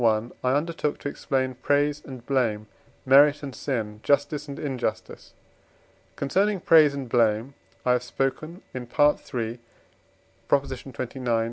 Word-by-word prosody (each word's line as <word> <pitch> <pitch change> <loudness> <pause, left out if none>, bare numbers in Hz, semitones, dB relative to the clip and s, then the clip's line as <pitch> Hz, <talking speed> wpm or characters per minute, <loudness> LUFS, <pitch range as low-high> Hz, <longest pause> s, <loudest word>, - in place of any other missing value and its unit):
I 110 +1 +2 0.2
undertook 150 -1 -1
to 145 - -3
explain 130 -2 -1
praise 145 +3 +1
and 130 -3 -10
blame, 115 -6 0 0.4
merit 145 +2 +6
and 135 -2 -5
sin, 110 -7 -3
justice 145 +2 +1
and 140 - -7
injustice. 130 -6 -4 0.8
Concerning 195 +8 +1
praise 155 -4 +5
and 135 -2 -5
blame 115 +2 +1 0.3
I 125 - +4
have 125 -1 +2
spoken 135 +7 -3
in 125 -1 -5
III. 120 -4 0 0.9
xxix. 135 -2 -2
135 Hz, 120 wpm, -25 LUFS, 120-145 Hz, 0.9 s, merit